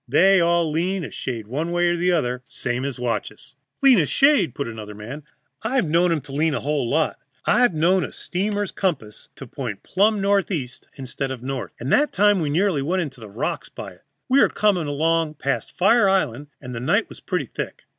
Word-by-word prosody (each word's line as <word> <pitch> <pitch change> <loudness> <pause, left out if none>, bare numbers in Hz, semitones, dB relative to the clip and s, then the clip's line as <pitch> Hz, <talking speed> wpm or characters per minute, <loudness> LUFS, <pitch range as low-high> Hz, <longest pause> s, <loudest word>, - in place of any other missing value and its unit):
They 185 +8 +5
all 170 -1 +2
lean 180 +4 -1
a - - -6
shade 115 -4 -5
one 150 +10 -3
way 175 0 +2
or 175 - +1
the 180 +1 +1
other, 125 -7 0
same 125 +1 -2
as 140 -3 -4
watches." 125 +2 -4 0.3
"Lean 260 -6 +7
a 155 - +2
shade!" 275 - +3
put 140 - -3
in 115 - -6
another 105 -1 -8
man. 120 +8 -8 0.4
"I've 245 0 0
known 170 +3 +2
'em 160 -3 0
to 135 - -13
lean 150 +2 +1
a - - -1
whole 140 -4 -1
lot. 160 +4 0 0.3
I've 245 -8 +3
known 180 +4 +3
a - - -5
steamer's 205 +2 -2
compass 135 - -3
to 135 - -9
point 120 -5 -6
plumb 210 +2 +2
northeast 195 -10 -1
instead 135 0 -5
of 130 -2 -6
north. 135 0 -4
And 125 +4 -1
that 295 +1 +3
time 205 0 +3
we 150 - -1
nearly 170 0 +1
went 180 +6 0
on 150 - -4
the 110 -5 -11
rocks 105 +5 -3
by - - -8
it. - - -20 0.2
We 265 +2 +4
were - - +5
coming 190 -7 +1
along 160 +2 0
past 140 -1 -3
Fire 200 +2 +4
Island, 145 -8 0
and 125 -2 -8
the 115 - -4
night 125 - +1
was - - -12
pretty - - -2
thick. - - -6
160 Hz, 215 wpm, -22 LUFS, 130-190 Hz, 0.4 s, Lean